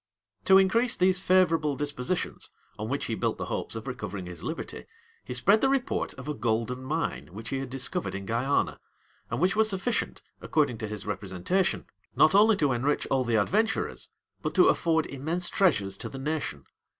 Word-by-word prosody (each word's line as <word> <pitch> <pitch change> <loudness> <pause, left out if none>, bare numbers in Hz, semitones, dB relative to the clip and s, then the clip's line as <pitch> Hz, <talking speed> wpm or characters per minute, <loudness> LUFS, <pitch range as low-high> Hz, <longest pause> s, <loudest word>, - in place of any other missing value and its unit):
To 190 - +7
increase 225 +6 +3
these 185 0 +3
favorable 165 -6 +3
dispositions, 145 +3 -3 0.3
on 110 +1 -3
which 140 +2 -1
he 115 - -2
built - - -1
the - - -4
hopes - - -3
of - - -6
recovering 95 -3 -5
his 90 -1 -8
liberty, 160 +6 -5 0.4
he - - -6
spread 210 +2 +4
the 270 - +3
report 270 -2 -1
of - - -9
a 150 - -1
golden 120 +1 -1
mine 155 +5 -2
which 110 +2 -7
he 135 - -2
had 135 -1 -5
discovered 125 -7 -2
in 100 0 -5
Guiana, 120 +7 0 0.5
and - - -2
which 185 +4 +2
was 220 0 +3
sufficient, 205 +4 -2 0.2
according 140 -7 +1
to 110 - -3
his 105 -2 -6
representation, 100 - -1 0.3
not 155 - +5
only 215 +2 +6
to 145 -6 +2
enrich 135 +5 0
all 135 -1 +3
the 120 -2 0
adventurers, 220 - 0 0.3
but - - -3
to - - +6
afford 160 -2 +2
immense 160 +6 -2
treasures 100 - +2
to - - -6
the 135 - -8
nation. 140 - -3
145 Hz, 185 wpm, -28 LUFS, 115-185 Hz, 0.5 s, To